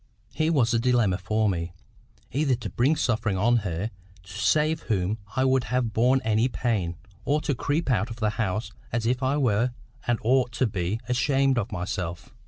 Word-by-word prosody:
Here 155 +3 +1
was 120 -7 +2
a 115 - +3
dilemma 115 -6 +2
for 110 +4 +1
me; 85 -3 -2 0.6
either 140 -1 +2
to 115 -5 -6
bring 135 - +2
suffering 115 -8 0
on 120 +5 +3
her, 100 0 -2 0.3
to 90 - -12
save 155 - +2
whom 100 0 0 0.2
I 130 0 +2
would 130 -1 +2
have 125 -3 -1
borne 125 +4 +3
any 110 +2 +2
pain, 105 -10 -1 0.3
or 145 +2 +1
to 150 - 0
creep 145 +3 -1
out 110 0 +1
of 115 - -6
the 110 -2 0
house 105 -1 -2 0.2
as 115 0 -1
if 125 +2 +1
I 135 +2 +1
were 120 -2 +1 0.3
and 120 -1 +2
ought 125 +1 +2
to 130 - +1
be 100 0 -2
ashamed 135 +1 +2
of 105 - -4
myself. 90 -1 -4
115 Hz, 190 wpm, -26 LUFS, 105-130 Hz, 0.6 s, a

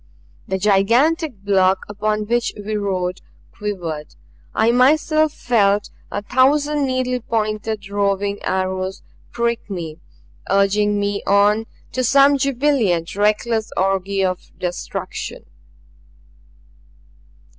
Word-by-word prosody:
The 190 - -1
gigantic 230 - +2
block 190 -1 +2
upon 210 +1 -1
which 235 +2 0
we 210 +1 -4
rode 185 -3 -2 0.3
quivered; 170 -8 -5 0.4
I 220 +2 +3
myself 310 +5 +3
felt 205 -6 +1 0.2
a 205 - -4
thousand 285 +4 +2
needle 255 -1 -1
pointed 215 -2 -2
roving 200 0 -1
arrows 185 0 -2 0.3
prick 235 -1 -2
me, 170 -4 -5 0.5
urging 205 +1 +2
me 200 0 -1
on 205 +2 +3 0.2
to 255 - -1
some 275 +3 +5
jubilant, 250 - +1
reckless 215 +2 +1
orgy 195 +1 +1
of 185 -1 -4
destruction. 180 -1 -5
210 Hz, 100 wpm, -20 LUFS, 195-240 Hz, 0.5 s, some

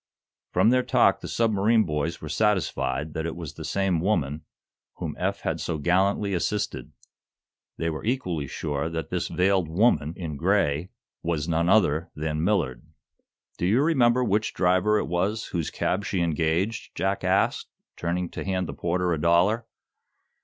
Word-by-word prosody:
From 95 +6 +4
their 130 0 +4
talk - - +3
the - - -6
submarine 110 0 +2
boys 75 +1 -2
were 80 - -6
satisfied 85 -5 0
that 80 +1 -2
it 80 - -5
was 85 -4 -7
the - - -9
same 95 -4 0
"woman" 80 -6 0 0.5
whom - - -5
Eph - - -1
had - - -2
so 85 - -2
gallantly 95 +5 +1
assisted. 105 +4 -2 0.9
They 85 - -2
were 80 - -6
equally 90 - -1
sure 75 +1 -3
that 80 -2 -5
this - - -1
veiled 95 -2 +1
"woman" 85 -4 +2
in 80 -5 -5
gray 85 -2 +1 0.3
was 80 -2 -2
none 85 +1 +1
other 85 -5 +3
than 75 0 -2
Millard. 80 - 0 0.8
"Do 90 - +1
you 115 +9 +3
remember 125 -6 +3
which 105 -1 0
driver 95 +3 +3
it - - 0
was 95 +6 -1
whose 85 -4 -2
cab 100 +3 -1
she 95 -3 -1
engaged?" 85 +6 -1
Jack 95 0 -1
asked, 95 +2 +1 0.3
turning 85 +1 -2
to - - -6
hand 95 -1 -1
the 70 - -5
porter 90 +3 0
a 75 - -2
dollar. 90 +8 +3
90 Hz, 160 wpm, -26 LUFS, 80-105 Hz, 0.9 s, From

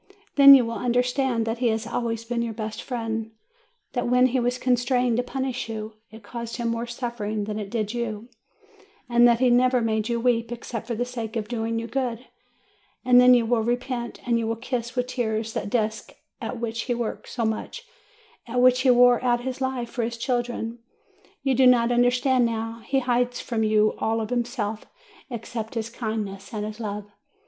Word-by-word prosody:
'* 415 - -35
Then 275 -1 +10
you 255 -3 +4
will 230 -2 -4
understand 245 0 +1
that 225 +1 -2
he 245 - +2
has 225 0 0
always 230 -1 -3
been 235 0 -2
your 230 -2 -3
best 220 0 -5
friend, 225 -3 -3 0.6
that 245 -2 -1
when 250 +1 +4
he 255 0 +2
was 245 +1 0
constrained 245 -1 +1
to - - +3
punish 260 -1 -3
you, 220 0 -5 0.2
it 220 -1 -13
caused 235 +2 -6
him 235 -1 -1
more 230 +1 -2
suffering 235 -3 -3
than 210 +1 -4
it 205 -2 -5
did 215 0 -2
you, 230 -2 -4 0.8
and 240 0 +5
that 235 -1 +4
he 255 -1 +4
never 250 +1 +4
made 220 -1 0
you 235 0 0
weep 230 -1 +1
except 235 -1 -6
for 235 - -2
the 245 +3 -1
sake 235 -2 -6
of 215 -2 -2
doing 230 -1 -2
you 230 - -3
good; 245 0 -3 0.8
and 250 -1 +7
then 250 0 +8
you 235 -2 +2
will 230 0 +2
repent, 240 +1 -2
and 235 -1 +2
you 225 - -2
will 225 - -1
kiss 240 +1 -4
with 250 0 0
tears 225 -3 -2
that 200 - -3
desk 220 -1 -2 0.3
at 245 - -4
which 230 -1 -3
he 245 - 0
worked 235 -2 -4
so 235 -2 -2
much, 220 - -4 0.6
at 245 +1 -1
which 250 0 +5
he 260 - +3
wore 245 0 +6
out 240 -1 +2
his 260 +1 -5
life 260 -3 -2
for 245 - -2
his 235 +1 -2
children. 240 -1 -2 0.6
You 270 - +2
do 260 0 +5
not 245 -1 +4
under 245 0 +4
stand 250 0 +2
now; 225 0 -4
he 270 -1 +1
hides 245 0 0
from 230 -2 -2
you 215 0 +3
all 225 +1 0
of 220 0 -4
himself, 235 -3 -2 0.5
except 230 -2 -6
his 225 0 -3
kindness 215 -4 -5
and 210 0 -2
his 215 +1 -7
love. 210 -2 -4
235 Hz, 205 wpm, -25 LUFS, 225-245 Hz, 0.8 s, Then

